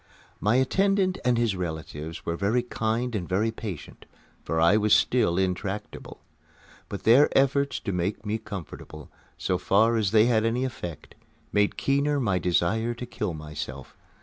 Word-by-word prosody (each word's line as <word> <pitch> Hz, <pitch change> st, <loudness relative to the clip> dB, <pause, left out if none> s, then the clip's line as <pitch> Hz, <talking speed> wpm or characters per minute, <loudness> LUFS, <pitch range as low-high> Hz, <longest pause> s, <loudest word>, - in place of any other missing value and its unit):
My 105 Hz, +4 st, +2 dB
attendant 190 Hz, +7 st, +2 dB
and 125 Hz, -1 st, +2 dB
his 115 Hz, -4 st, +1 dB
relatives 80 Hz, -2 st, -6 dB
were 85 Hz, -, -1 dB
very 105 Hz, +7 st, +1 dB
kind 120 Hz, +1 st, -2 dB
and 95 Hz, -6 st, -3 dB
very 105 Hz, +5 st, +1 dB
patient, 105 Hz, -8 st, -8 dB, 0.4 s
for 80 Hz, -, -1 dB
I 85 Hz, +5 st, +5 dB
was 105 Hz, 0 st, +4 dB
still 115 Hz, -9 st, +2 dB
intractable. 95 Hz, +2 st, -3 dB, 0.7 s
But -, -, -6 dB
their 130 Hz, +6 st, +6 dB
efforts 140 Hz, 0 st, +2 dB
to -, -, -3 dB
make 90 Hz, +4 st, -2 dB
me 105 Hz, +2 st, -1 dB
comfortable, 95 Hz, -7 st, -9 dB, 0.3 s
so -, -, -1 dB
far 110 Hz, +4 st, +3 dB
as 105 Hz, -4 st, +1 dB
they 110 Hz, +1 st, +5 dB
had 115 Hz, -3 st, +2 dB
any 120 Hz, +3 st, 0 dB
effect, 90 Hz, -, -7 dB, 0.4 s
made 105 Hz, 0 st, +2 dB
keener 140 Hz, +1 st, +1 dB
my 100 Hz, -8 st, +1 dB
desire 110 Hz, +7 st, 0 dB
to 125 Hz, -, -6 dB
kill 105 Hz, -7 st, -4 dB
myself. 75 Hz, -3 st, -7 dB
110 Hz, 155 wpm, -26 LUFS, 90-120 Hz, 0.7 s, their